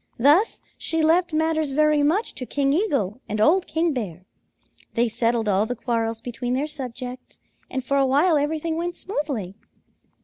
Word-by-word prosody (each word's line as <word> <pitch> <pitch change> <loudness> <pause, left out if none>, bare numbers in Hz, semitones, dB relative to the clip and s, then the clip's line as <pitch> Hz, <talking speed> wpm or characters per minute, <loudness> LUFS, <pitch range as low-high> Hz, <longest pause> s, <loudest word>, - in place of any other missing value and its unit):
Thus 295 - +4 0.2
she 325 -1 +1
left 345 +2 +3
matters 315 -2 0
very 305 0 +3
much 330 +10 +1
to 255 - -7
King 275 -1 +1
Eagle 275 - 0
and 210 +1 -2
old 345 - +4
King 325 0 0
Bear. 185 -8 -5 0.7
They 235 +1 +3
settled 230 0 0
all 205 +1 +2
the 245 - -3
quarrels 230 -1 -2
between 245 +1 -3
their 275 +3 0
subjects, 255 -4 -6 0.3
and 260 0 -3
for 280 +2 +1
a 275 - +4
while 305 +6 +4
everything 315 +2 -1
went 345 +1 -2
smoothly. 280 - -4
275 Hz, 165 wpm, -23 LUFS, 235-315 Hz, 0.7 s, Thus